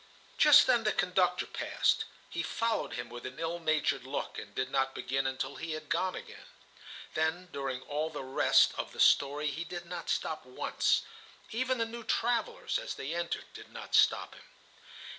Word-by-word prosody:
Just 295 -1 +9
then 240 -3 +3
the 215 - +2
conductor 180 0 +2
passed. - - 0 0.2
He - - -3
followed 230 - -1
him 120 +1 -4
with 120 0 -9
an 130 0 -7
ill 165 +1 -3
natured 155 -5 +1
look, 135 +2 -4
and - - -11
did 130 - -2
not 135 -1 +1
begin 135 +1 -1
until 130 0 -3
he 165 -1 -4
had 155 -1 -7
gone 185 0 0
again. - - -10 0.7
Then 160 +3 -1
during 135 -2 -4
all 150 +3 -2
the 150 -3 -6
rest 130 +1 +4
of - - -4
the - - -11
story 145 +2 +4
he 160 +5 -4
did 175 +1 -7
not 170 0 -6
stop 155 - -1
once. 125 0 0 0.5
Even 255 +3 0
the 230 - +1
new 235 +1 -7
travellers 245 - 0
as - - -5
they 140 +4 -4
entered 170 0 -2
did - - -11
not - - -9
stop - - +4
him. - - -15
160 Hz, 180 wpm, -31 LUFS, 135-215 Hz, 0.7 s, Just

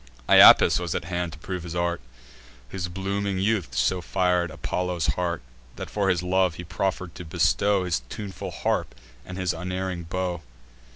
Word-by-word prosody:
Iapis - - +8
was 85 -2 -3
at - - -3
hand 85 -1 -3
to - - -10
prove 90 +3 -5
his 85 0 -7
art, 85 0 -1 0.7
Whose 90 +5 -4
blooming 95 +2 -2
youth 100 -1 0
so 90 -1 +1
fir'd 90 0 +1
Apollo's 90 +2 -2
heart, 85 -5 -2 0.3
That, - - -7
for 100 -2 0
his 90 -1 +1
love, 90 -2 +1
he 90 - -7
proffer'd 90 0 -3
to 90 - -8
bestow 100 +4 +1
His 85 -8 -1
tuneful 100 -3 -6
harp - - -2 0.3
and 90 +5 -8
his 90 -2 0
unerring 90 0 -4
bow. 90 0 -3
90 Hz, 165 wpm, -25 LUFS, 85-95 Hz, 0.7 s, Iapis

